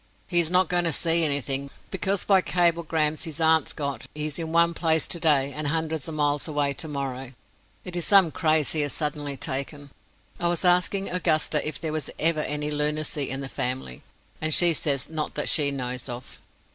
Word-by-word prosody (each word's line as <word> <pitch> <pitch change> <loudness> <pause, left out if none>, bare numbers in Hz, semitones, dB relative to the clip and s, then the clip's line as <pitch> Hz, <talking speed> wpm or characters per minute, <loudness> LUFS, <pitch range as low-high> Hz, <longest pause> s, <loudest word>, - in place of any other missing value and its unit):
He 175 -2 +2
is 165 -2 +1
not 180 0 +3
going 175 0 0
to 165 - +2
see 165 +2 +3
anything, 140 -2 0 0.2
because 190 +1 -1
by 195 -2 +4
cablegrams 165 -3 0
his 160 -1 -7
aunts 160 -2 +3
got 140 -2 -5
he 150 0 -3
is 155 +1 -4
one 170 +1 +2
place 160 -2 +1
today 145 -5 +1
and 155 -1 -3
hundreds 160 -1 -2
of 160 - -5
miles 145 0 0
away 145 -2 0
tomorrow. 135 -4 -5 0.5
It 180 -1 -7
is 175 - -1
some 195 -4 +5
craze 155 -4 +2
he 155 - 0
has 145 -1 -2
suddenly 150 -2 -3
taken. 140 +2 -5 0.5
I 175 - 0
was 175 +2 -1
asking 180 +2 +2
Augusta 155 -4 +1
if 155 - -3
there 155 -2 -3
was 155 -3 -3
ever 165 -1 +3
any 150 0 -2
lunacy 150 -1 -1
in 135 +1 -3
the 135 - -5
family, 125 - -4 0.4
and 155 0 -1
she 175 -1 +7
says 140 -3 0
not 155 -1 -4
that 150 - +1
she 145 -3 +5
knows 125 -1 -4
of. 120 +1 -9
155 Hz, 190 wpm, -25 LUFS, 140-170 Hz, 0.5 s, she